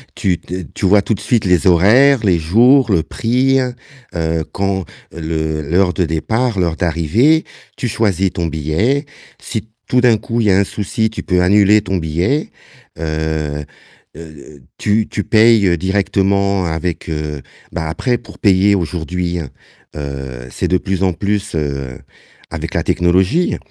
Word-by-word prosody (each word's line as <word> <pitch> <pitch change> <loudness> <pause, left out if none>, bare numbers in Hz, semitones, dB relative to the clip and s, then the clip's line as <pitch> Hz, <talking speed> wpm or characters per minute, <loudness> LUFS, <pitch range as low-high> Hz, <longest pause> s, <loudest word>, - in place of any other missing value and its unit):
tu 90 -3 0
d 90 -1 -7
tu 100 - -3
vois 100 +2 +5
tout 110 - -1
de 100 - -4
suite 110 -1 0
les 90 +1 +2
horaires, 115 +10 +5
les 90 -4 +3
jours, 115 - +4
le 85 -4 +3
prix, 130 +9 +1 0.6
heu, 80 -1 -1
quand 95 -1 -2 0.3
le 80 -1 -3
l'heure 90 0 +2
de 90 +1 0
départ, 110 +7 -1
l'heure 85 -2 0
d'arrivée, 90 - +2 0.3
tu 125 - -2
choisis 100 -4 0
ton 85 -2 -2
billet, 80 - 0 0.4
si 110 -2 -5 0.2
tout 125 0 +2
d'un 120 -3 +4
coup 115 +2 -2
il 105 - +1
y - - +5
a 95 - +4
un - - +4
souci, 110 +3 -2
tu 110 - -7
peux 90 -1 +1
annuler 105 +3 +4
ton 95 0 -2
billet, 85 - -1 0.5
heu, 80 -2 -2 0.5
heu, 75 -3 -12 0.2
tu 105 +1 +1
tu 105 - -3
payes 110 -6 +4
directement 100 +1 +1
avec, 80 +1 -3
heu 75 -2 -4 0.3
bah, 80 - -3
après 120 - -1
pour 115 -3 -15
payer 100 0 +4
aujourd'hui, 90 0 -3 0.6
heu, 65 -4 -6
c'est - - -2
de 90 - +2
plus 95 0 -3
en 95 -2 +2
plus, 100 +1 -2
heu, 70 -4 -3 0.5
avec - - -5
la - - 0
technologie. 95 - +1
95 Hz, 155 wpm, -17 LUFS, 80-105 Hz, 0.6 s, vois